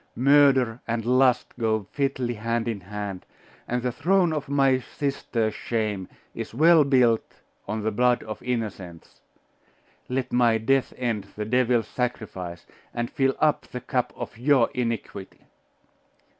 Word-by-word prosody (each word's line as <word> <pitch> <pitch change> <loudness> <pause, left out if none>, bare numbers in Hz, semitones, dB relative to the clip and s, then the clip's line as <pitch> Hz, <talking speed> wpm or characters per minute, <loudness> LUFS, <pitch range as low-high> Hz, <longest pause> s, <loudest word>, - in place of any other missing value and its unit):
Murder 130 -3 +4
and 115 -1 -2
lust 125 0 +3
go 110 -3 0
fitly 135 -4 -1
hand 115 +1 -2
in 115 -3 -2
hand, 100 0 -6 0.4
and 125 0 -2
the 125 - 0
throne 180 +4 +2
of 150 -3 -4
my 135 -2 +3
sister's 120 -5 -2
shame 105 -5 -2 0.3
is - - -7
well 160 +3 +6
built 125 -5 +2 0.3
on 105 +1 -3
the 110 - 0
blood 125 +3 +2
of 110 -1 -7
innocents! 100 -8 -5 0.9
Let 130 0 -2
my 120 -2 +4
death 130 +4 +1
end 115 -5 -2
the 105 - -3
devil's 120 -1 +2
sacrifice, 95 -9 -4 0.3
and 120 0 -2
fill 135 -1 +1
up 155 -1 +2
the 125 - -6
cup 125 0 -1
of 115 - -7
your 130 -2 +3
iniquity! 115 -5 -4
120 Hz, 140 wpm, -25 LUFS, 110-130 Hz, 0.9 s, well